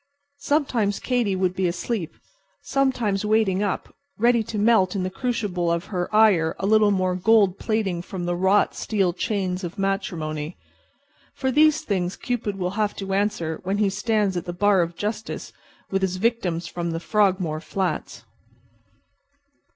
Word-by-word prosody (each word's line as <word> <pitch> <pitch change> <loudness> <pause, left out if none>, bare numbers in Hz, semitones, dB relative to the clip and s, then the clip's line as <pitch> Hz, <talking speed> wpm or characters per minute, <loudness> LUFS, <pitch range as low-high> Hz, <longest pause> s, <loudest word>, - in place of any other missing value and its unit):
Sometimes 250 -10 0
Katy 240 -6 0
would 185 -1 0
be 185 0 0
asleep; 175 0 -3 0.5
sometimes 245 -8 0
waiting 210 -3 +2
up, 205 -2 -2 0.2
ready 235 +1 +3
to 220 0 -5
melt 205 -3 +3
in 190 - -1
the 185 - -2
crucible 195 -6 -1
of 170 +2 -1
her 180 -1 -1
ire 205 -7 +4
a - - -3
little 215 0 +5
more 185 -2 +1
gold 200 0 +3
plating 210 -6 -1
from 180 -1 -6
the 175 - 0
wrought 190 +3 +3
steel 195 -5 0
chains 190 -1 -2
of 175 +3 -6
matrimony. 170 -5 -2 0.8
For 265 -1 -1
these 305 +3 +4
things 185 - -2
Cupid 235 -5 -3
will 180 -1 -2
have 210 -1 0
to 195 -1 -4
answer 195 -6 -1
when 195 +2 -1
he 205 -2 +2
stands 210 -1 0
at 175 0 -3
the 175 - -4
bar 200 +1 +3
of 170 0 -2
justice 215 +3 -4 0.4
with 195 0 0
his 190 -1 0
victims 185 -6 0
from 170 0 -4
the 165 0 -2
Frogmore 185 -5 +1
flats. 190 +1 -3
195 Hz, 160 wpm, -24 LUFS, 180-215 Hz, 0.8 s, little